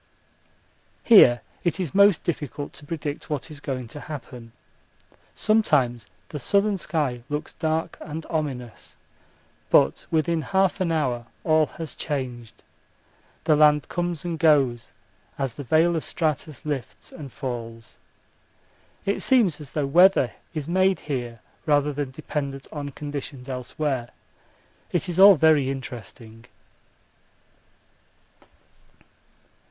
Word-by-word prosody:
Here 125 - +7 0.2
it 175 +2 0
is 175 -7 -3
most 200 -2 +5
difficult 145 -3 -4
to 145 - -11
predict 150 -2 -5
what 150 -1 -3
is 150 - -9
going 130 -4 -4
to 145 - -9
happen. 125 -6 -9 0.8
Sometimes 140 - +2 0.2
the 150 - -5
southern 200 - +1
sky 145 -9 -1
looks 150 +1 -4
dark 160 0 -2
and 160 +1 -6
ominous, 135 -7 -5 0.7
but - - +3
within 165 +1 +1
half 190 +2 +1
an 175 -3 +1
hour 125 -7 -1 0.2
all 155 -1 +3
has 165 -2 -6
changed 125 -6 -5 0.8
the 155 - +4
land 150 -1 +4
comes 175 -2 -3
and 170 -2 -3
goes 140 -7 +3 0.5
as 135 -4 -2
the 145 - -7
veil 160 +6 +3
of 160 - -2
stratus 155 -3 -3
lifts 140 -6 -5
and 140 -5 -9
falls. 115 -4 -7 1.1
It 200 +1 0
seems 210 - +3
as 140 - -11
though 150 -2 0
weather 180 +7 +5 0.2
is 155 -2 -3
made 185 +2 +2
here 120 -6 -4 0.3
rather 145 -1 +3
than 145 -1 -3
dependent 140 0 -5
on 145 -2 -5
conditions 140 -2 -7
elsewhere. 130 0 -3 0.8
It 175 +1 0
is 175 0 -2
all 200 0 +10
very 155 -4 +4
interesting. 115 -3 -8
150 Hz, 120 wpm, -24 LUFS, 130-165 Hz, 1.1 s, all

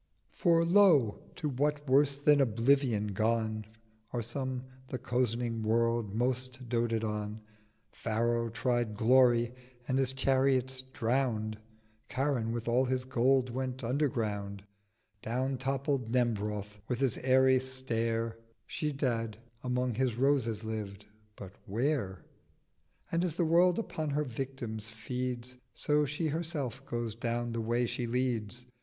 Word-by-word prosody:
'For 170 -2 +3
lo, 170 - +5 0.2
to 155 - -2
what 145 +2 -1
worse 140 +1 +4
than 145 0 +5
oblivion 120 -2 +2
gone 110 +1 0 0.5
Are 120 -2 -2
some 130 +2 -3 0.2
the 130 - -3
cozening 120 -2 -1
World 115 -1 +1
most 130 +1 -2
doted 115 -1 0
on. 105 0 -3 0.5
Pharaoh 115 +1 0
tried 120 -2 0
Glory: 120 +1 +4 0.3
and 130 0 +1
his 130 -1 +1
Chariots 130 -1 +2
drown'd: 115 -4 0 0.5
890 - - -11
Karun 130 -4 +1
with 115 0 -4
all 125 +3 +3
his 130 0 -1
Gold 130 0 +2
went 130 +1 -3
underground: 110 -7 -1 0.6
Down 130 +4 -1
toppled 135 -2 -1
Nembroth 105 -4 -1
with 125 -2 -2
his 135 -4 +1
airy 130 0 +5
Stair: 115 -3 -2 0.3
Schedad 125 -8 -1 0.3
among 125 0 0
his 125 0 0
Roses 125 -5 +1
lived—but 105 -2 -8
where? 110 -3 -1 0.9
'And 170 +1 +1
as 170 -4 -1
the 175 - +1
World 175 +2 +4
upon 155 -8 -3
her 145 +1 +1
victims 120 -4 -5
feeds 125 +2 -4 0.2
So 150 0 +2
She 150 +3 -1
herself 150 -5 -3
goes 120 -4 -2
down 120 +1 -2
the 115 0 -2
Way 120 +2 +1
she 120 +1 -2
leads. 120 -1 -2
125 Hz, 125 wpm, -31 LUFS, 115-135 Hz, 0.9 s, lo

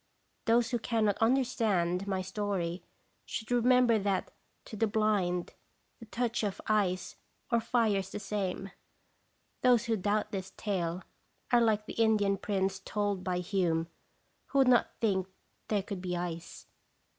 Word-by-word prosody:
Those 230 0 +3
who 240 - +1
cannot 220 -3 +1
un 230 +4 +5
derstand 200 -8 0
my 190 -1 -1
story 185 -3 -2 0.4
should 220 +1 -6
remember 245 -1 +4
that 195 -2 -1 0.3
to - - -8
the 225 +2 +1
blind 205 -5 0 0.5
the 230 - -11
touch 235 +1 -1
of 205 -3 -2
ice 195 -4 0 0.3
or 235 - +4
fire 225 -3 +2
is 190 -1 -3
the 205 - -5
same. 195 -2 -3 0.9
Those 245 -3 +4
who 230 -1 +1
doubt 210 +1 0
this 195 -1 -5
tale 180 -3 -2 0.5
are 240 -1 +5
like 215 -2 +2
the - - -7
Indian 205 -3 +3
prince 195 -1 -1
told 205 0 -1
of - - -11
by 180 -1 -1
Hume, 170 -3 0 0.6
who 280 - -2
would 270 -2 +5
not 245 -1 +3
think 190 -5 +1 0.4
thare 205 -3 0
could 200 -2 -6
be 180 -1 -2
ice. 170 -1 -5
205 Hz, 155 wpm, -31 LUFS, 185-225 Hz, 0.9 s, un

